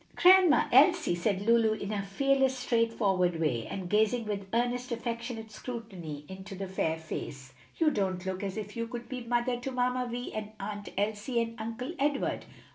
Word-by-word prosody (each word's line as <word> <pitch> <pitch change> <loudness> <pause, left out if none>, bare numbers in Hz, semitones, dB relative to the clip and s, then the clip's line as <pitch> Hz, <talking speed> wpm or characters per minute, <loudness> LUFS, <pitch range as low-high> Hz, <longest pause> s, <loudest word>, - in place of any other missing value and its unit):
"Grandma 365 -3 +7
Elsie," - - +5
said 190 +3 0
Lulu 225 0 +4
in 205 -1 -4
her 205 -2 -1
fearless, 265 +6 +2
straightforward 215 -8 +1
way, 125 -8 0
and 190 -2 -5
gazing 220 +4 +2
with 200 -2 -3
earnest, 245 +2 0
affectionate 235 -1 -4
scrutiny 190 - -7
into 190 +1 -8
the 195 +1 -4
fair 165 -4 -1
face, 135 -4 -7 0.2
"you 315 -2 +4
don't 190 -5 -1
look 190 0 -3
as 195 0 -4
if 210 -1 -6
you 230 0 -2
could 240 0 -7
be 255 -2 -5
mother 240 +1 0
to 250 - -4
Mamma 250 0 0
Vi 245 +1 -4
and 215 0 -5
Aunt 205 0 -5
Elsie 210 +4 0
and 230 0 -1
Uncle 235 +7 -4
Edward." 285 0 0
220 Hz, 175 wpm, -30 LUFS, 195-245 Hz, 0.2 s, Grandma